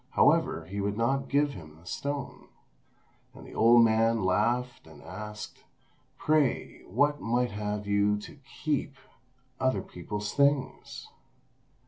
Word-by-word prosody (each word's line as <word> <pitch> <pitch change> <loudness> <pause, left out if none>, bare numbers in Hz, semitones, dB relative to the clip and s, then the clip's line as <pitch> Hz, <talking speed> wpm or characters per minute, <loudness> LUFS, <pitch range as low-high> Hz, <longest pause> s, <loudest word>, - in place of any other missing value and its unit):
However, 80 - +3
he 100 +4 -4
would 100 +1 -2
not 135 +4 0
give 145 0 +2
him 80 -5 -11
the 85 - -20
stone; 140 +8 -5 0.9
and - - -12
the - - -12
old 115 +1 +6
man 115 -1 +2
laughed, 115 +5 0
and 80 -2 -14
asked, 105 0 -8 0.5
"Pray, 150 -4 +1
what 145 +8 +2
right 120 +1 0
have 105 0 -3
you 100 0 +2
to - - -11 0.2
keep 145 -2 -1 0.6
other 130 -7 +1
people's 105 +4 -5
things?" 140 -1 0
115 Hz, 125 wpm, -29 LUFS, 100-135 Hz, 0.9 s, old